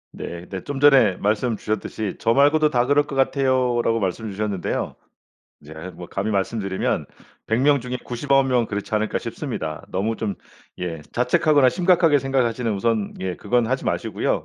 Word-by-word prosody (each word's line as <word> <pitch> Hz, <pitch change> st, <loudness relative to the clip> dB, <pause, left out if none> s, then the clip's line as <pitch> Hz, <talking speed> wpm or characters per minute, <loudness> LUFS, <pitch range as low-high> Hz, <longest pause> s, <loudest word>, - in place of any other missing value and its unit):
네. 85 Hz, +1 st, -7 dB
네. 95 Hz, -2 st, -6 dB
좀 145 Hz, -1 st, -5 dB
전에 135 Hz, -9 st, +6 dB
말씀 110 Hz, +2 st, 0 dB
주셨듯이 105 Hz, -1 st, -3 dB
"저 115 Hz, -, +2 dB
말고도 150 Hz, +2 st, +4 dB
다 125 Hz, -4 st, +2 dB
그럴 145 Hz, +2 st, +3 dB
것 140 Hz, -, -6 dB
같아요."라고 130 Hz, -4 st, +1 dB
말씀 105 Hz, +3 st, -2 dB
주셨는데요. 100 Hz, -2 st, -3 dB, 0.7 s
이제 75 Hz, -, -11 dB, 0.2 s
뭐 90 Hz, -, -9 dB
감히 100 Hz, +3 st, -2 dB
말씀드리면 100 Hz, -1 st, -1 dB, 0.4 s
100 110 Hz, +2 st, +1 dB
명 140 Hz, 0 st, +4 dB
중에 125 Hz, +1 st, -4 dB
99 135 Hz, +2 st, +1 dB
명은 125 Hz, -3 st, +2 dB
그렇지 100 Hz, +1 st, -4 dB
않을까 110 Hz, 0 st, 0 dB
싶습니다. 80 Hz, -1 st, -5 dB
너무 105 Hz, +5 st, -1 dB
좀 105 Hz, -3 st, -2 dB, 0.4 s
예 85 Hz, -3 st, -4 dB
자책하거나 130 Hz, +2 st, +3 dB
심각하게 175 Hz, -4 st, +3 dB
생각하시는 125 Hz, -3 st, 0 dB
우선 110 Hz, 0 st, -1 dB
예 95 Hz, -1 st, -2 dB
그건 120 Hz, -1 st, +1 dB
하지 130 Hz, +3 st, -2 dB
마시고요. -, -, -1 dB
120 Hz, 355 characters per minute, -22 LUFS, 100-135 Hz, 0.7 s, 전에